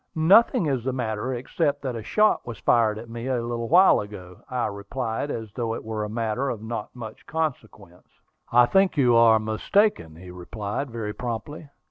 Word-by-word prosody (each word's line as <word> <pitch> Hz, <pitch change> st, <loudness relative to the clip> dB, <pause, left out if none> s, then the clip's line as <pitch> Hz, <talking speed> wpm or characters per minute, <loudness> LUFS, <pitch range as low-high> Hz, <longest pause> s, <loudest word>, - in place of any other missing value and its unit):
"Nothing 195 Hz, +6 st, +5 dB
is 135 Hz, -5 st, -1 dB
the 130 Hz, -, -1 dB
matter, 115 Hz, -1 st, -3 dB
except 145 Hz, +3 st, -2 dB
that 130 Hz, -3 st, -3 dB
a 115 Hz, -, -5 dB
shot 215 Hz, -, +2 dB
was 115 Hz, -3 st, -6 dB
fired 110 Hz, -3 st, +2 dB
at 115 Hz, +2 st, -9 dB
me 115 Hz, +2 st, -6 dB
a 130 Hz, -2 st, 0 dB
little 115 Hz, 0 st, -4 dB
while 180 Hz, +5 st, +6 dB
ago," 90 Hz, -3 st, -9 dB
I 125 Hz, -2 st, -1 dB
replied, 110 Hz, +6 st, -4 dB
as 110 Hz, -6 st, -5 dB
though 115 Hz, -2 st, -2 dB
it -, -, -7 dB
were 110 Hz, -1 st, -4 dB
a 105 Hz, -, -4 dB
matter 115 Hz, +4 st, -2 dB
of 110 Hz, -4 st, -5 dB
not 110 Hz, 0 st, -6 dB
much 110 Hz, -3 st, -9 dB
consequence. 110 Hz, -, -5 dB, 0.4 s
"I 120 Hz, +1 st, +6 dB
think 195 Hz, +4 st, +2 dB
you 125 Hz, -4 st, +4 dB
are 115 Hz, -1 st, +6 dB
mistaken," 110 Hz, -, 0 dB
he 90 Hz, +2 st, -11 dB
replied 100 Hz, +8 st, -5 dB
very 110 Hz, -3 st, -5 dB
promptly. 125 Hz, +7 st, -6 dB
115 Hz, 185 wpm, -24 LUFS, 110-135 Hz, 0.4 s, while